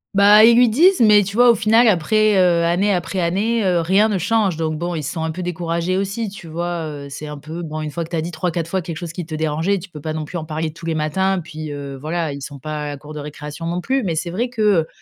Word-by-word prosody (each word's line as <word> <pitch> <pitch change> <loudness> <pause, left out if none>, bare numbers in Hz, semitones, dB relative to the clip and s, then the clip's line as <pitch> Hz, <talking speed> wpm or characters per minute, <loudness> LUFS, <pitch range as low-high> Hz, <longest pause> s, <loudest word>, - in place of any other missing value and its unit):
Bah, 205 +2 +7
ils 230 +1 +7
lui 245 -1 +6
disent 340 - +4
mais 210 -2 +7
tu 200 +2 -6
vois 245 0 +7
au 235 - +2
final 225 +3 +4
après, 215 +3 +3
heu, 175 -2 +3
année 180 +5 +2
après 185 0 -2
année, 205 +7 0
heu, 180 -3 +2
rien 195 +6 +3
ne 205 - 0
change 200 -2 +1
donc 160 -1 -1
bon 175 +2 -3
ils 155 - -3
sont 160 +4 -4
un 160 - -1
peu 180 +3 -5
découragés 170 +1 -2
aussi, 200 +3 -2
tu 195 -3 -11
vois? 170 0 -3
Heu, 145 -2 -7
c'est 150 - -7
un 150 -1 -7
peu 160 +4 -7
bon 155 -1 -5
une 150 - -4
fois 170 +3 -3
que - - -15
tu - - -4
as 160 - 0
dit 170 +2 -5
3-4 170 0 -2
fois 190 +1 -1
quelque 165 -1 -6
chose 170 -2 -6
qui 175 0 -5
te 155 - -5
dérangeait, 160 +5 0
tu 190 +2 -8
peux 155 -4 -11
pas 155 +1 -4
non 155 -1 -4
plus 175 +3 -5
en 155 - -7
parler 155 0 -3
tous 165 0 -10
les 160 - -1
matins, 190 +5 0
puis 155 -1 -7
heu, 140 -1 -6
voilà 155 +2 -3
ils 140 - -8
sont 140 +1 -8
pas 150 +2 -5
à - - -4
la 145 - -5
cour 150 +2 -11
de 150 - -6
récréation 150 +2 -7
non 175 +1 -2
plus. 265 +5 0
Mais 170 -5 -1
c'est 170 +2 -3
vrai 240 +7 -1
que, 235 -3 -5 0.2
heu, 160 - -7
170 Hz, 295 wpm, -20 LUFS, 155-200 Hz, 0.2 s, Bah